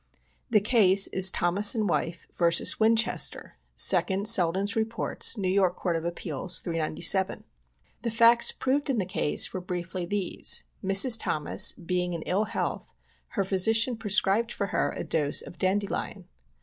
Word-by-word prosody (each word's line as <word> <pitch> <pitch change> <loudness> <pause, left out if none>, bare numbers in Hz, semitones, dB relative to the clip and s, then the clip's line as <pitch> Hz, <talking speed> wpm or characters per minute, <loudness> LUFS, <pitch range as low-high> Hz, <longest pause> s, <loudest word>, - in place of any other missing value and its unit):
The 215 -4 +2
case 200 -3 +3
is 190 0 +3
Thomas 200 +6 +3
and 215 -2 -2
wife 170 -1 -3
vs. 170 -1 +3
Winchester, 225 +1 -1 0.2
2d 195 +1 +2
Selden's 195 -2 +3
Heports, 225 +1 0
N. 195 0 0
Y. 185 - +2
Court 175 -1 -4
of 165 0 -5
Appeals, 170 0 -3
397. 170 +3 0 0.6
The 235 - -3
facts 230 +1 +4
proved 280 +3 -2
in 265 - -1
the 195 - -2
case 175 -5 -1
were 185 - -5
briefly 180 0 -6
these: 200 -1 0 0.2
Mrs. 195 +5 +5
Thomas 150 -7 0
being 180 0 -4
in 165 -2 -6
ill 200 +4 -2
health, - - -5 0.5
her 200 - +1
physican 225 +5 +1
prescribed 205 +1 0
for 200 - -4
her - - -1
a - - -5
dose 150 -3 0
of - - -14
dandelion. 200 +2 -3
195 Hz, 150 wpm, -25 LUFS, 180-220 Hz, 0.6 s, Mrs